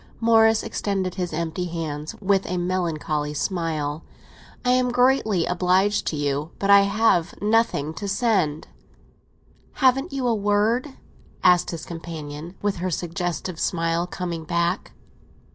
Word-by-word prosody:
Morris 225 -1 +4
extended 190 -3 -2
his 180 -2 -3
empty 165 +2 -2
hands 160 -3 -5
with 195 -1 +1
a 180 - -2
melancholy 160 -4 -2
smile. 155 -3 -2 0.6
"I 250 - +4
am 250 0 +3
greatly 245 -7 +2
obliged 185 +3 +1
to - - -1
you, 145 +1 -1
but 200 0 +1
I 200 - +9
have 200 -4 +2
nothing 210 -8 +1
to 200 - -5
send." 195 -8 0 1.1
"Haven't 270 +4 +2
you 270 -2 -2
a 240 - +3
word?" 220 +6 +1 0.5
asked 180 -1 +5
his 165 -2 -5
companion, 165 0 -7
with 205 -2 0
her 185 +2 -2
suggestive 175 0 -3
smile 165 0 0
coming 175 -2 -4
back. 170 +3 -1
180 Hz, 130 wpm, -23 LUFS, 165-205 Hz, 1.1 s, I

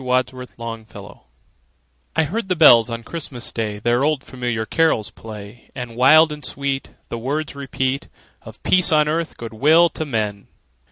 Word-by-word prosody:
CHRISTMAS 125 0 -2 0.3
BELLS 100 -1 -12 1.0
I - - +3
heard 190 +6 -3
the 185 - +2
bells 125 -8 +7
on 115 0 -5
Christmas 135 -5 -5
Day 110 -2 -3
Their 120 +4 +1
old, 150 -2 +1
familiar 120 -4 -3
carols 160 -8 +1
play, 105 +1 -11
And 125 -3 -6
wild 155 +6 +6
and 150 -1 -8
sweet 135 +1 -3 0.2
The 115 - -4
words 140 +5 -3
repeat 135 -1 -2 0.3
Of - - -14
peace 180 -2 +5
on 150 -1 +4
earth, 160 +2 -2
good 115 -1 -8
will 160 +9 +5
to 160 - -4
men! 110 -8 -3
130 Hz, 160 wpm, -21 LUFS, 115-155 Hz, 1.0 s, bells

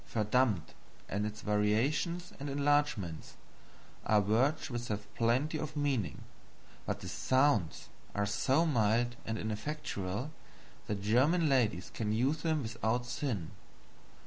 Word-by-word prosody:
1. 110 -2 0
"Verdammt," 105 -6 +2 0.4
and 105 +2 -1
its 110 0 -7
variations 130 - +1
and 140 +1 -4
enlargements, 140 - 0 0.7
are 105 - +4
words 120 +10 +2
which 120 0 -3
have 105 -1 -5
plenty 130 +7 +1
of 150 0 -5
meaning, 135 - -1 0.6
but - - -2
the - - -6
SOUNDS 115 - +1 0.3
are 105 0 +1
so 135 +10 +2
mild 120 -3 +2
and 110 0 -1
ineffectual 110 0 -3 0.6
that 100 -2 -3
German 145 - +3
ladies 115 -10 +1
can 105 -2 -2
use 135 +8 +1
them 155 -3 0
without 115 +1 -1
sin. 120 - -3
120 Hz, 125 wpm, -32 LUFS, 105-145 Hz, 0.7 s, are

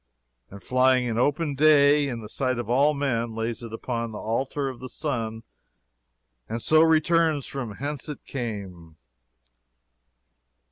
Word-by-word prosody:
And 100 0 -12
flying 130 0 +3
in 115 -1 -1
open 145 +3 +1
day 145 0 +5
in 120 -4 -4
the 105 - -8
sight 130 +2 -1
of 120 -1 -4
all 145 +4 +3
men, 120 -5 -1
lays 115 +1 -3
it 115 -2 -8
upon 115 0 -4
the 105 - -7
altar 130 +6 -2
of 130 -3 -6
the 130 +1 -8
sun, 115 -7 -3 1.1
and 115 +2 -3
so 155 +6 +4
returns 160 -2 +3
from 120 -7 -5
whence 145 +3 -5
it 150 - -8
came. 95 - -6
130 Hz, 145 wpm, -25 LUFS, 115-145 Hz, 1.1 s, day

